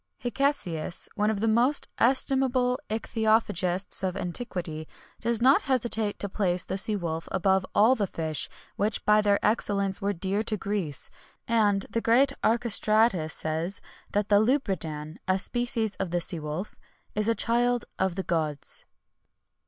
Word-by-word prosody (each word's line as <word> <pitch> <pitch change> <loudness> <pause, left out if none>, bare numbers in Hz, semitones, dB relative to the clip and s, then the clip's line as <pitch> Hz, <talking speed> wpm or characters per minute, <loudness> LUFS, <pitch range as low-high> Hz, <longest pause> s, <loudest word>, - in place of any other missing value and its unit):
Hicesius, 240 - -1
one 210 -1 +1
of 210 -2 -2
the 225 - +1
most 240 +6 +3
estimable 260 0 +3
ichthyophagists 215 -5 0
of 190 0 -1
antiquity, 175 -5 -4 0.3
does 235 0 0
not 265 +2 +6
hesitate 225 -5 0
to 200 - -2
place 185 -3 -1
the 190 - -3
sea 210 +2 0
wolf 165 -4 -4
above 190 0 +1
all 220 +5 +6
the 210 -6 -1
fish 160 -4 -2 0.3
which 210 +2 -1
by 210 0 +5
their 205 -1 +3
excellence 200 -3 0
were 200 +1 0
dear 195 +2 -2
to 220 -1 -2
Greece;[XXI 190 -9 -3 0.4
83] - - +4
and 205 -3 +3
the 230 - -1
great 260 +5 +3
Archestratus 220 -6 +3
says, 160 +4 -2 0.3
that 205 0 -1
the 205 -1 +6
lubridan 175 - -1
(a 185 0 +2
species 230 0 0
of 190 - -3
the 175 +1 0
sea 170 0 -2
wolf) 155 +6 -5 0.4
is 210 +1 -1
a 230 - +2
child 240 +1 +1
of 190 -2 0
the 190 - -3
gods. 155 -5 -3
205 Hz, 150 wpm, -27 LUFS, 180-230 Hz, 0.4 s, not